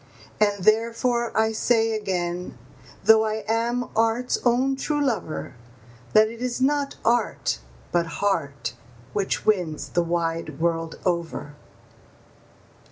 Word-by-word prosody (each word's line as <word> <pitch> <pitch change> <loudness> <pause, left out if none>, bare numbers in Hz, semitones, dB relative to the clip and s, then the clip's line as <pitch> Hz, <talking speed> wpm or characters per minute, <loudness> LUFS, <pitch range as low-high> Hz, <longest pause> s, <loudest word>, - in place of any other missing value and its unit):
And 205 -2 +2
therefore 230 +3 +2
I 220 0 +3
say 225 0 +2
again, 180 - -2 0.5
though 220 0 +7
I 215 0 -2
am 235 +2 0
art's 230 +2 +1
own 255 +3 +3
true 295 +2 -1
lover, 245 - -2 0.6
That 215 0 +7
it 230 +2 -9
is 250 -1 -2
not 280 +1 +1
art, 240 +1 +1 0.3
but 170 -1 +1
heart, 160 -11 -1 0.4
which 200 -2 -1
wins 160 -9 0
the 175 - +1
wide 165 -3 -2
world 165 -1 0
over. 170 -4 -2
215 Hz, 115 wpm, -24 LUFS, 175-235 Hz, 0.6 s, though